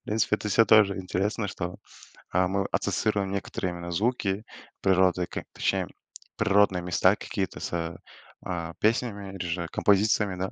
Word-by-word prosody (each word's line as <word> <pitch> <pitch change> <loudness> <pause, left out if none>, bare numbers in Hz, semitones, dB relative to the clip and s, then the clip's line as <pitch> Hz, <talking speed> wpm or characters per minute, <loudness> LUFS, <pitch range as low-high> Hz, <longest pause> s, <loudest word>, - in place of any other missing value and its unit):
В - - -66
принципе, 105 0 +1
это 105 - -5
всё 115 +3 +5
тоже 105 -3 +5
интересно, 100 +3 -1
что, 90 -2 -5 0.6
а, 90 0 +3
мы 95 +1 -1
ассоциируем 100 -3 0
некоторые 95 -2 -3
именно 85 0 -6
звуки 105 0 0 0.4
природы, 95 -1 +3
как - - -5
точнее - - 0 0.5
природные 100 -3 +3
места 90 +2 +3
какие-то 95 -2 -4
с, 85 -1 -3 0.5
а, 85 -2 -4
песнями 105 -3 0
или - - -8
же 85 0 -2
композициями, 105 -1 +2
да. 95 +1 -3
95 Hz, 150 wpm, -27 LUFS, 90-105 Hz, 0.6 s, всё